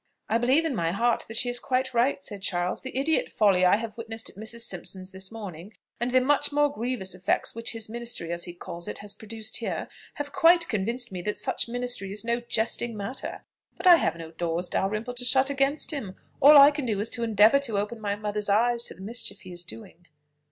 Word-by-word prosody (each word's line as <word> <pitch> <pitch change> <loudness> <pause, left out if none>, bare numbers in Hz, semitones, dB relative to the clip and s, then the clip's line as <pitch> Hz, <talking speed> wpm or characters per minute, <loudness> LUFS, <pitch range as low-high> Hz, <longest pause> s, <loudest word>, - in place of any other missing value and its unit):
"I 225 - +1
believe 265 +7 +3
in 315 - 0
my 165 -5 0
heart 230 +6 +1
that 225 - -5
she 245 - +1
is 245 0 +1
quite 260 0 -1
right," 255 +4 +1
said 205 -3 -8
Charles: 180 -2 -2
"the 260 0 -6
idiot 305 +4 +2
folly 195 -4 +3
I 180 - +6
have 225 +1 -5
witnessed 225 0 -5
at - - -24
Mrs. 220 +3 -6
Simpson's 190 -5 -4
this 190 +1 -7
morning; 200 -3 -8 0.3
and 240 +1 0
the 255 +1 +4
much 290 +3 +2
more 290 0 +2
grievous 235 -6 -2
effects 185 0 -1
which 230 +1 -2
his 225 -1 -4
ministry, 230 -7 -4
as 170 0 -1
he 175 - -7
calls 170 0 -7
it, - - -4
has 205 -1 -6
produced 220 +1 -4
here, - - -3 0.3
have 290 -1 -5
quite 335 +1 +5
convinced 230 +3 -1
me 180 -2 -5
that 210 +3 -3
such - - -1
ministry 245 -5 0
is 210 +3 -2
no 235 +1 +1
jesting 235 -1 -1
matter. 205 +6 -5 0.3
But 360 - -7
I 355 -2 +9
have - - 0
no 165 -1 -9
doors, 170 +1 -2
Dalrymple, 215 +7 -2
to 245 0 -3
shut 265 +2 +3
against 280 +3 +1
him; 225 -11 -5 0.2
all 290 +2 +9
I 280 +1 +9
can 290 -3 -4
do 210 -3 0
is 215 +2 -2
to 235 - -2
endeavour 220 +4 +5
to 235 -7 -2
open 210 +3 -3
my 205 -1 -1
mother's 210 0 -3
eyes 235 +3 +2
to - - -6
the 185 - -14
mischief 215 -1 -5
he 185 - -11
is 175 0 -3
doing." 180 -1 -12
225 Hz, 230 wpm, -26 LUFS, 200-250 Hz, 0.3 s, I